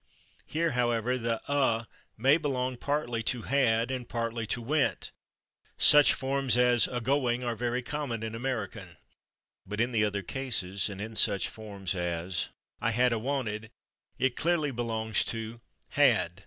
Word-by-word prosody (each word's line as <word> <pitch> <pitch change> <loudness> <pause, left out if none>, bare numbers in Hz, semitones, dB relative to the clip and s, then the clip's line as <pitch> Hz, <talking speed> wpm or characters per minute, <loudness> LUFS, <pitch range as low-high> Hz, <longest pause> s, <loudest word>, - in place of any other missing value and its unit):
Here, 165 +1 0
however, 120 -1 +1
the 115 -2 -2
/a/ 130 -5 +1 0.3
may 135 +7 +5
belong 130 -5 -1
partly 120 -3 -1
to 115 +1 -2
/had/ 120 -3 +2
and 125 -2 -4
partly 115 -1 -2
to 120 - -1
/went/; 145 +4 0 0.7
such 150 -1 +7
forms 135 -2 0
as 125 -1 +4
/a 125 -2 -4
going/ 125 -1 +1
are 120 -1 -1
very 120 +2 -1
common 125 -5 -3
in 110 0 -4
American. 110 -8 -4 0.7
But 105 +2 -6
in 120 +2 +1
the 110 -3 +2
other 100 -1 -1
cases, 100 -6 -2
and 100 -1 -7
in 110 +2 -6
such 100 -3 +2
forms 100 -4 -4
as 85 0 -2 0.3
"I - - +1
had 125 +2 +3
'/a/ 115 - -1
wanted," 110 -4 -2 0.5
it 130 -2 +1
clearly 160 -3 +1
belongs 110 -2 0
to 115 0 -5 0.3
/had 105 -11 +3
120 Hz, 155 wpm, -29 LUFS, 110-130 Hz, 0.7 s, such